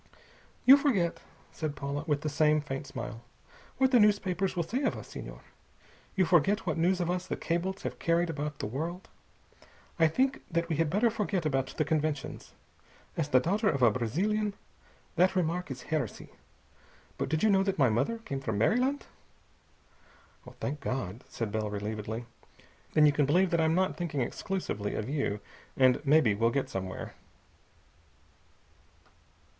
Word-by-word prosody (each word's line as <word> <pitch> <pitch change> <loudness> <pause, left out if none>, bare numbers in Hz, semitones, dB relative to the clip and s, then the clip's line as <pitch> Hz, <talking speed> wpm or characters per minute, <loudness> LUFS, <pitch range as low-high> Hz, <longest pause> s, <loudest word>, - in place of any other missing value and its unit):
"You 270 +2 +10
forget," 215 - +1 0.3
said 155 -2 -4
Paula, 140 +1 -3
with 145 -2 +1
the 155 - -3
same 150 +1 +3
faint 140 -1 -5
smile, 115 -2 -6 0.6
"what 265 0 +3
the 245 - +6
newspapers 195 -3 +2
will 170 - 0
say 240 - -2
of 275 - 0
us, - - -10
Senhor. - - -8 0.7
You 190 -2 +3
forget 175 +4 +3
what - - 0
news 180 +3 +2
of 175 0 0
us 180 0 -3
the - - -2
cables 185 +3 -2
have - - -4
carried 170 +1 +2
about 150 -2 -4
the - - -4
world. 160 - -4 0.9
I 165 - +6
think 260 - +1
that 170 0 0
we 160 - 0
had 165 -1 +2
better 215 +7 +2
forget 200 -6 -1
about 135 -3 +1
the 155 - +1
conventions. 155 -2 -2 0.6
As 155 -3 -1
the 130 - +5
daughter 205 - +1
of 140 -6 0
a 120 - +7
Brazilian, 200 - -1 0.6
that 185 +3 +4
remark 180 -1 0
is 130 -2 -6
heresy. 150 -8 -3 0.9
But - - -1
did 155 +3 0
you 220 - +5
know 195 -1 +4
that 195 0 0
my 135 -5 +4
mother 225 - 0
came 220 -12 -5
from 110 -6 -2
Maryland?" 250 - +2 1.5
"Thank 145 +2 -3
God!" 125 -5 -4
said 115 -3 -4
Bell 110 0 -1
relievedly. 105 +2 -4 0.7
"Then 155 - +6
you 150 - +6
can 145 -1 +1
believe 180 +5 +3
that 170 -1 +2
I'm 160 0 +2
not 185 +1 +1
thinking 165 -6 -2
exclusively 120 - -3
of 110 - -3
you, 135 -8 -1 0.4
and 130 0 +4
maybe 145 -6 +4
we'll 115 +3 +2
get 135 +2 -1
somewhere." 95 -1 -5
155 Hz, 165 wpm, -30 LUFS, 135-185 Hz, 1.5 s, You